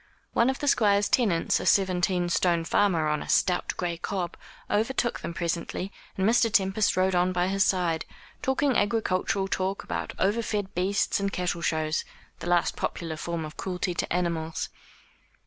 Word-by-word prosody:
One 235 Hz, -, +3 dB
of 265 Hz, -, -1 dB
the 290 Hz, -, -3 dB
Squire's 205 Hz, -6 st, +4 dB
tenants, 200 Hz, -10 st, +2 dB
a -, -, -5 dB
seventeen 180 Hz, -2 st, +2 dB
stone 170 Hz, -1 st, +2 dB
farmer, 170 Hz, -5 st, +2 dB
on 150 Hz, 0 st, 0 dB
a -, -, -8 dB
stout 180 Hz, -1 st, +2 dB
gray 175 Hz, -2 st, -2 dB
cob, 180 Hz, -1 st, -3 dB, 0.3 s
overtook 235 Hz, +3 st, 0 dB
them -, -, -5 dB
presently, 170 Hz, +3 st, -3 dB, 0.3 s
and 190 Hz, +1 st, +2 dB
Mr. 230 Hz, 0 st, +4 dB
Tempest 195 Hz, 0 st, +2 dB
rode 185 Hz, 0 st, +3 dB
on 180 Hz, +1 st, +2 dB
by 180 Hz, 0 st, +1 dB
his 195 Hz, 0 st, +3 dB
side, 175 Hz, -4 st, +1 dB, 0.4 s
talking 265 Hz, 0 st, +1 dB
agricultural 200 Hz, -2 st, +1 dB
talk 190 Hz, +1 st, -2 dB
about -, -, -4 dB
over 205 Hz, +5 st, +1 dB
fed 205 Hz, -3 st, -3 dB
beasts 190 Hz, +4 st, +1 dB
and 200 Hz, 0 st, -1 dB
cattle 180 Hz, -2 st, -2 dB
shows, 155 Hz, -1 st, 0 dB, 0.4 s
the 175 Hz, -, -5 dB
last 175 Hz, -1 st, +2 dB
popular 165 Hz, -2 st, -3 dB
form 165 Hz, +1 st, -4 dB
of 155 Hz, +2 st, -10 dB
cruelty 180 Hz, -1 st, -2 dB
to -, -, -3 dB
animals. 165 Hz, -2 st, -1 dB
185 Hz, 165 wpm, -27 LUFS, 170-200 Hz, 0.4 s, Squire's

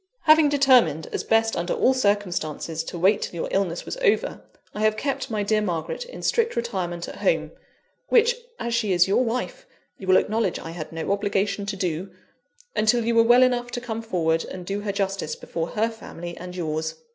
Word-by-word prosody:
"Having 310 Hz, -1 st, +6 dB
determined, 255 Hz, -, +4 dB
as -, -, -2 dB
best 225 Hz, 0 st, +2 dB
under 175 Hz, +1 st, -1 dB
all 260 Hz, -, +3 dB
circumstances, 180 Hz, -, -1 dB
to 175 Hz, -, -6 dB
wait 195 Hz, +4 st, +3 dB
till -, -, -4 dB
your 165 Hz, -, -2 dB
illness 185 Hz, -3 st, -1 dB
was -, -, -5 dB
over, -, -, +1 dB, 0.3 s
I -, -, -6 dB
have 215 Hz, 0 st, +2 dB
kept 275 Hz, 0 st, -2 dB
my 215 Hz, -2 st, -1 dB
dear 215 Hz, +1 st, +1 dB
Margaret 175 Hz, -, -3 dB
in -, -, -10 dB
strict 465 Hz, 0 st, +1 dB
retirement 185 Hz, -7 st, -3 dB
at -, -, -8 dB
home 165 Hz, -6 st, 0 dB, 0.6 s
(which, 475 Hz, 0 st, +4 dB, 0.2 s
as 235 Hz, 0 st, -2 dB
she 220 Hz, -4 st, +1 dB
is 175 Hz, 0 st, +4 dB
your 200 Hz, +6 st, +3 dB
wife, 250 Hz, -, -3 dB, 0.3 s
you 190 Hz, -, -8 dB
will 185 Hz, -, +6 dB
acknowledge 215 Hz, -3 st, 0 dB
I 165 Hz, -, -7 dB
had 160 Hz, -2 st, -7 dB
no 165 Hz, +3 st, -3 dB
obligation 200 Hz, 0 st, 0 dB
to 205 Hz, -, -2 dB
do), 180 Hz, 0 st, -2 dB, 0.7 s
until 225 Hz, +2 st, +2 dB
you 235 Hz, -, +1 dB
were 230 Hz, -, +6 dB
well 240 Hz, +2 st, +6 dB
enough 245 Hz, -1 st, +1 dB
to 245 Hz, -, -4 dB
come 230 Hz, -2 st, -5 dB
forward 165 Hz, -7 st, 0 dB
and 180 Hz, -1 st, -8 dB
do 200 Hz, +2 st, -2 dB
her 205 Hz, -1 st, -2 dB
justice 195 Hz, -5 st, -2 dB
before 165 Hz, -1 st, -4 dB
her 220 Hz, +5 st, 0 dB
family 175 Hz, -6 st, -8 dB
and 180 Hz, 0 st, -8 dB
yours. 160 Hz, -2 st, -2 dB
200 Hz, 200 wpm, -24 LUFS, 175-235 Hz, 0.7 s, Having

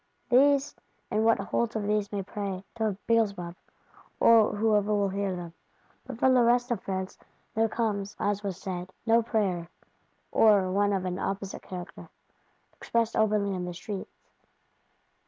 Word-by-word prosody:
These, 275 Hz, +2 st, +4 dB, 0.4 s
and 215 Hz, -1 st, +1 dB
what 225 Hz, 0 st, +4 dB
holds 230 Hz, +4 st, -1 dB
of 215 Hz, -, -1 dB
these 210 Hz, 0 st, 0 dB
may 200 Hz, -2 st, -2 dB
pray,—to 200 Hz, +2 st, -4 dB
Beelzebub, 200 Hz, -7 st, 0 dB, 0.6 s
or 225 Hz, -3 st, +5 dB
whoever 210 Hz, -1 st, +2 dB
will 205 Hz, -1 st, +2 dB
hear 195 Hz, -1 st, -2 dB
them. 170 Hz, -2 st, -7 dB, 0.5 s
But 260 Hz, -4 st, -6 dB
from 260 Hz, +2 st, +4 dB
the 250 Hz, -, +5 dB
rest 245 Hz, +1 st, +3 dB
of 225 Hz, -5 st, -1 dB
France 190 Hz, 0 st, -4 dB, 0.3 s
there 225 Hz, 0 st, +2 dB
comes, 210 Hz, -3 st, -2 dB
as 205 Hz, 0 st, 0 dB
was 195 Hz, -4 st, -4 dB
said, 180 Hz, -1 st, -5 dB, 0.2 s
no 230 Hz, 0 st, +4 dB
prayer; 195 Hz, -7 st, -1 dB, 0.6 s
or 200 Hz, -4 st, +4 dB
one 205 Hz, +1 st, +2 dB
of 190 Hz, -2 st, -1 dB
an 180 Hz, 0 st, -3 dB
opposite 195 Hz, 0 st, -4 dB
character, 180 Hz, -1 st, -9 dB, 0.6 s
"expressed 230 Hz, 0 st, -1 dB
openly 210 Hz, -2 st, +2 dB
in 180 Hz, -1 st, -3 dB
the 180 Hz, -1 st, -6 dB
streets." 195 Hz, +2 st, -7 dB
205 Hz, 150 wpm, -28 LUFS, 190-225 Hz, 0.6 s, or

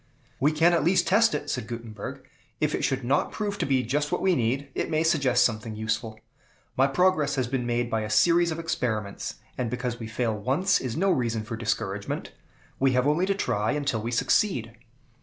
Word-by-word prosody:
"We 145 Hz, +3 st, +3 dB
can 165 Hz, +3 st, +4 dB
at 165 Hz, -, +2 dB
least 180 Hz, +4 st, +3 dB
test 225 Hz, +3 st, +4 dB
it," 145 Hz, -, -4 dB
said 110 Hz, -, -3 dB
Gutenberg. 115 Hz, -3 st, -7 dB, 0.3 s
"If -, -, 0 dB
it -, -, -1 dB
should 135 Hz, -1 st, 0 dB
not 135 Hz, +4 st, +1 dB
prove 205 Hz, -2 st, -3 dB
to -, -, 0 dB
be 130 Hz, -2 st, +2 dB
just 145 Hz, +5 st, -1 dB
what -, -, 0 dB
we 190 Hz, -1 st, +4 dB
need, 130 Hz, +4 st, 0 dB
it -, -, -2 dB
may 155 Hz, 0 st, +1 dB
suggest 140 Hz, -7 st, +3 dB
something 110 Hz, -1 st, -2 dB
useful. 110 Hz, 0 st, -3 dB, 0.6 s
My 135 Hz, +1 st, +4 dB
progress 155 Hz, -1 st, +2 dB
has 130 Hz, -2 st, 0 dB
been 125 Hz, -1 st, -2 dB
made 120 Hz, 0 st, 0 dB
by 110 Hz, -, +1 dB
a 105 Hz, -, -4 dB
series 170 Hz, +9 st, +4 dB
of 160 Hz, -, -3 dB
experiments; 110 Hz, -11 st, -3 dB, 0.2 s
and 125 Hz, -2 st, -1 dB
because 125 Hz, 0 st, -3 dB
we 115 Hz, -, -6 dB
fail 110 Hz, 0 st, -1 dB
once, 135 Hz, -, +1 dB
is 120 Hz, -3 st, -4 dB
no 195 Hz, +3 st, +2 dB
reason 115 Hz, -7 st, 0 dB
for 110 Hz, +1 st, -5 dB
discouragement. 100 Hz, -3 st, -3 dB, 0.5 s
We 135 Hz, -1 st, +3 dB
have 125 Hz, +1 st, +2 dB
only 155 Hz, +6 st, +2 dB
to 195 Hz, -, +1 dB
try 110 Hz, -, 0 dB
until 140 Hz, -7 st, -1 dB
we 115 Hz, -, -3 dB
succeed." 120 Hz, -, +1 dB
125 Hz, 205 wpm, -26 LUFS, 115-155 Hz, 0.6 s, can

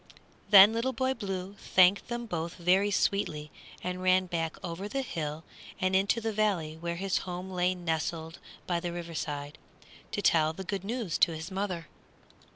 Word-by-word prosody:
Then 205 Hz, +1 st, +9 dB
Little 240 Hz, +3 st, 0 dB
Boy 260 Hz, +2 st, 0 dB
Blue 195 Hz, -5 st, -5 dB
thanked 185 Hz, +2 st, +4 dB
them 240 Hz, 0 st, -4 dB
both 170 Hz, -5 st, -4 dB
very 185 Hz, +3 st, +3 dB
sweetly 155 Hz, -7 st, 0 dB, 0.3 s
and 180 Hz, 0 st, -3 dB
ran 185 Hz, 0 st, +4 dB
back 165 Hz, -3 st, -3 dB
over 175 Hz, +3 st, -5 dB
the 270 Hz, +2 st, -2 dB
hill 155 Hz, -, -4 dB, 0.4 s
and 185 Hz, 0 st, +1 dB
into 200 Hz, +4 st, +3 dB
the 225 Hz, -1 st, -2 dB
valley 195 Hz, -7 st, 0 dB
where 170 Hz, +1 st, -4 dB
his 190 Hz, +2 st, 0 dB
home 180 Hz, +1 st, -6 dB
lay 180 Hz, 0 st, +1 dB
nestled 165 Hz, -1 st, -3 dB, 0.3 s
by 175 Hz, -1 st, 0 dB
the 175 Hz, 0 st, -4 dB
river 170 Hz, -1 st, -6 dB
side, 145 Hz, -1 st, -4 dB, 0.5 s
to 205 Hz, -, -2 dB
tell 160 Hz, -1 st, +4 dB
the 190 Hz, -, -7 dB
good 195 Hz, 0 st, -3 dB
news 220 Hz, -4 st, -2 dB
to 165 Hz, -, +4 dB
his 160 Hz, +4 st, -7 dB
mother. 185 Hz, -4 st, -3 dB
180 Hz, 170 wpm, -29 LUFS, 165-200 Hz, 0.5 s, Then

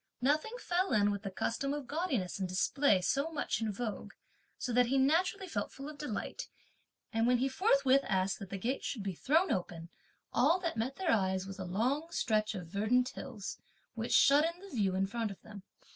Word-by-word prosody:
Nothing 305 Hz, -, +1 dB
fell 365 Hz, -, 0 dB
in 205 Hz, -1 st, +4 dB
with 200 Hz, -1 st, -3 dB
the 200 Hz, -, -4 dB
custom 275 Hz, +8 st, -2 dB
of 295 Hz, -2 st, -5 dB
gaudiness 270 Hz, -, -2 dB
and 185 Hz, -1 st, -2 dB
display 200 Hz, +3 st, +2 dB
so 280 Hz, -, 0 dB
much 285 Hz, -8 st, -2 dB
in 220 Hz, -1 st, 0 dB
vogue, 215 Hz, +1 st, -5 dB, 0.4 s
so 250 Hz, -, -3 dB
that 245 Hz, 0 st, +4 dB
he 270 Hz, +3 st, +1 dB
naturally 355 Hz, +8 st, +2 dB
felt -, -, -3 dB
full 275 Hz, +1 st, -8 dB
of 300 Hz, -2 st, -9 dB
delight; 270 Hz, -8 st, -4 dB, 0.7 s
and, 225 Hz, +1 st, +2 dB
when 250 Hz, 0 st, +4 dB
he 260 Hz, +3 st, +1 dB
forthwith 275 Hz, -4 st, +3 dB
asked 190 Hz, 0 st, 0 dB
that 195 Hz, -, -8 dB
the 195 Hz, -, -4 dB
gate 245 Hz, +8 st, -2 dB
should 220 Hz, -7 st, -3 dB
be 195 Hz, -1 st, -2 dB
thrown 320 Hz, -, +2 dB
open, 170 Hz, -2 st, -3 dB, 0.4 s
all 305 Hz, +9 st, +4 dB
that 335 Hz, -2 st, -2 dB
met 235 Hz, +5 st, -2 dB
their 375 Hz, -3 st, 0 dB
eyes 190 Hz, -3 st, +1 dB
was 195 Hz, +1 st, -8 dB
a 190 Hz, -, -4 dB
long 255 Hz, -, 0 dB
stretch 215 Hz, -7 st, 0 dB
of 180 Hz, -3 st, -5 dB
verdant 220 Hz, +8 st, +1 dB
hills, 205 Hz, -6 st, -7 dB, 0.3 s
which 230 Hz, 0 st, -4 dB
shut 280 Hz, +3 st, +6 dB
in 335 Hz, +2 st, -2 dB
the 395 Hz, -8 st, -10 dB
view 195 Hz, -4 st, +1 dB
in 190 Hz, +1 st, +2 dB
front 225 Hz, +2 st, -2 dB
of 195 Hz, -3 st, -9 dB
them. 210 Hz, -2 st, -10 dB
240 Hz, 205 wpm, -33 LUFS, 200-290 Hz, 0.7 s, shut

